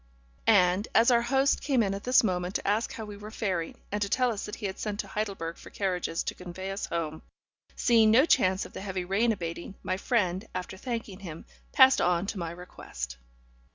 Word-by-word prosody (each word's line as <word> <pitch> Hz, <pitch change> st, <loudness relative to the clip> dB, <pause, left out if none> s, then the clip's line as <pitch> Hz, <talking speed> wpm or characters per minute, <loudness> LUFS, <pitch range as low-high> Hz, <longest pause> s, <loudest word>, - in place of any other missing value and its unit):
And, 185 Hz, -1 st, +4 dB
as 230 Hz, +3 st, +6 dB
our 235 Hz, -1 st, +5 dB
host 270 Hz, +3 st, +2 dB
came 265 Hz, -5 st, +2 dB
in 195 Hz, -1 st, 0 dB
at 200 Hz, -, -6 dB
this 250 Hz, 0 st, +5 dB
moment 180 Hz, -2 st, -1 dB
to -, -, -2 dB
ask 210 Hz, +3 st, +1 dB
how 220 Hz, -, -6 dB
we 205 Hz, -1 st, -9 dB
were 210 Hz, +1 st, -9 dB
faring, 190 Hz, -7 st, -2 dB
and 205 Hz, 0 st, -2 dB
to 200 Hz, -, 0 dB
tell 250 Hz, +3 st, +2 dB
us 210 Hz, -2 st, -4 dB
that 210 Hz, -, -5 dB
he 215 Hz, -, -7 dB
had 190 Hz, 0 st, -4 dB
sent 210 Hz, -1 st, -3 dB
to -, -, -13 dB
Heidelberg 195 Hz, -6 st, -3 dB
for -, -, -12 dB
carriages 180 Hz, -4 st, -2 dB
to -, -, -3 dB
convey 185 Hz, +2 st, -7 dB
us 195 Hz, -, -4 dB
home, 160 Hz, -2 st, -3 dB, 0.5 s
seeing 225 Hz, -3 st, +4 dB
no 245 Hz, +7 st, +6 dB
chance 190 Hz, -, +3 dB
of -, -, -12 dB
the -, -, -6 dB
heavy 190 Hz, -2 st, -3 dB
rain 210 Hz, +6 st, +2 dB
abating, 170 Hz, -1 st, -5 dB
my 185 Hz, -, -1 dB
friend, 195 Hz, -2 st, 0 dB
after 180 Hz, +1 st, -4 dB
thanking 225 Hz, -2 st, -5 dB
him, 165 Hz, -5 st, -8 dB, 0.3 s
passed 265 Hz, -2 st, +6 dB
on 175 Hz, +1 st, +2 dB
to 200 Hz, 0 st, -4 dB
my 170 Hz, -1 st, -3 dB
request. 170 Hz, -, -7 dB
200 Hz, 215 wpm, -28 LUFS, 180-225 Hz, 0.5 s, as